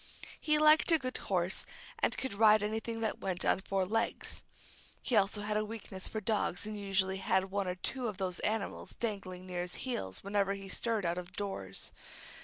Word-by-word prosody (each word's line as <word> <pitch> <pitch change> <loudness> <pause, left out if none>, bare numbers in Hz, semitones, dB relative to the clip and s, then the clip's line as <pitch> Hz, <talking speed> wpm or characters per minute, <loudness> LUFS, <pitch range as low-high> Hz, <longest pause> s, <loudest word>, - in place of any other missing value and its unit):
He 305 -1 +3
liked 305 +2 +6
a 325 - +7
good 255 -3 -3
horse, 185 -1 +1 0.3
and - - +1
could 265 - -2
ride 215 0 +6
anything 225 +2 -2
that 220 - -1
went 185 -1 -1
on - - +3
four 195 -1 0
legs. 225 +4 -1 0.6
He 250 - +1
also 205 0 +3
had 210 0 -1
a 215 - +2
weakness 210 -3 -5
for 220 - -3
dogs, 210 -3 0
and 215 0 -4
usually 195 -2 +1
had 190 0 +1
one 200 -1 0
or 180 - -1
two 245 +7 -2
of 210 -4 -4
those 185 -2 -1
animals 215 -1 -2
dangling 195 -5 -3
near 180 -1 -3
his 180 0 -4
heels 95 - -3
whenever 200 0 +1
he 195 -1 -8
stirred 225 -1 0
out 170 +1 0
of 180 +1 -9
doors. 175 - -4
200 Hz, 195 wpm, -33 LUFS, 185-220 Hz, 0.6 s, a